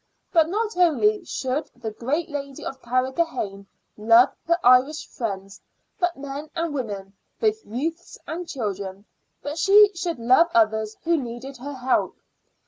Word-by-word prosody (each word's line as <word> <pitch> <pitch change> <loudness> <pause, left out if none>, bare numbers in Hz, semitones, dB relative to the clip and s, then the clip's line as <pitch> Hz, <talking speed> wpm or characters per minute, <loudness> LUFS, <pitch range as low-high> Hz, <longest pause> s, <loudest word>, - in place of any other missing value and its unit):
But 325 -3 +4
not 435 +3 -1
only 365 +4 +3
should 265 +1 -2
the 220 - -5
great 275 +10 -2
lady 280 -3 -6
of 265 -1 -6
Carrigrohane 255 -5 -1 0.3
love 230 +4 +6 0.2
her 340 0 +3
Irish 255 +5 +4
friends, 195 -4 -5 0.4
but 350 -1 0
men 285 +2 -6
and 330 -2 -2
women, 200 -7 -5 0.3
both 435 -1 +1
youths 320 +9 -4
and 340 +2 -5
children, 200 -5 -4 0.4
but 295 +3 -4
she 410 +3 +7
should 345 -1 -3
love 255 +9 +4
others 220 -1 +2
who 335 0 +2
needed 255 +1 -6
her 285 +4 -7
help. 255 0 0
275 Hz, 140 wpm, -24 LUFS, 230-335 Hz, 0.4 s, she